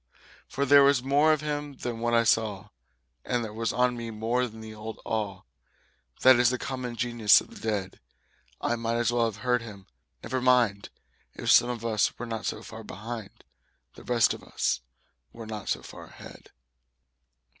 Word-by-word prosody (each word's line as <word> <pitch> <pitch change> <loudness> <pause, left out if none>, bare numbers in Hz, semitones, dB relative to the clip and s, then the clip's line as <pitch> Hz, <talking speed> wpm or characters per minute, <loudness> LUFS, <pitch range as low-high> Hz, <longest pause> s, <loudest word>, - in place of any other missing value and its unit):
For 140 - -2
there 140 +1 +7
was 140 -2 +4
more 145 +4 +4
of 155 -1 +1
him 145 -1 -4
than 120 -2 -5
what 120 0 +1
I 115 - +4
saw. 105 -3 0 0.5
And 120 -2 -1
there 105 - -8
was 115 +1 -1
on 125 0 +1
me 115 -1 -6
more 115 +3 -1
than 110 -1 -12
the 110 0 -9
old 110 +1 -8
awe 105 -4 -3 0.8
That 130 -1 +7
is 120 -1 +5
the 125 - -1
common 130 -2 -5
genius 120 -3 +4
of - - -11
the - - -12
dead. 100 -4 -3 0.6
I 120 - 0
might 115 0 -2
as 120 0 +1
well 120 -1 +2
have 115 +1 -5
heard 125 -1 +2
him: 100 -4 -10 0.4
"Never 130 -1 -2
mind; 120 -6 +2 0.5
If - - 0
some 120 - +6
of 115 -2 -5
us 110 -3 +1
were 120 - -5
not 115 -2 -4
so - - -4
far - - -9
behind, 110 -1 -8 0.5
The - - -14
rest 120 -2 +3
of - - -10
us - - -1 0.5
were 115 - -9
not 110 -2 -6
so - - -1
far - - -11
ahead." - - -13
115 Hz, 185 wpm, -27 LUFS, 110-125 Hz, 0.8 s, there